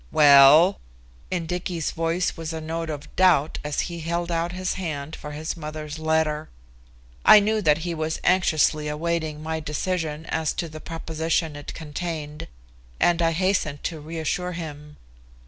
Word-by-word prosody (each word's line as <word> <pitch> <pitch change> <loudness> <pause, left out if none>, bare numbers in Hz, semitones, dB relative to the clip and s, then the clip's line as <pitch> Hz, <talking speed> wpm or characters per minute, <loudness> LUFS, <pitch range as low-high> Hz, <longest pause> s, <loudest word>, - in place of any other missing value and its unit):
"Well!" 145 +5 +7 0.5
In 175 -2 -2
Dicky's 175 -1 -3
voice 165 +2 -1
was 165 0 -5
a 160 - -4
note 165 +1 -4
of 150 -1 -7
doubt 175 -5 +3
as 150 0 -1
he 170 -1 -5
held 170 +2 -2
out 170 +1 -1
his 185 +1 -2
hand 155 -4 -4
for 150 - -8
his 155 +2 -4
mother's 155 -1 -6
letter. 160 -1 0 0.7
I 215 - +9
knew 215 +1 +1
that 155 -2 +2
he 175 - -2
was 160 0 -2
anxiously 155 -4 +2
awaiting 155 0 -2
my 160 0 -2
decision 160 0 -3
as 160 -1 -1
to 170 - -3
the 155 -1 -10
proposition 160 -1 -2
it 145 0 -8
contained, 155 -1 -5 0.5
and 175 0 +3
I 165 0 +2
hastened 175 -5 0
to 165 -3 -3
reassure 165 +3 -3
him. 150 -3 -8
160 Hz, 155 wpm, -24 LUFS, 150-170 Hz, 0.7 s, I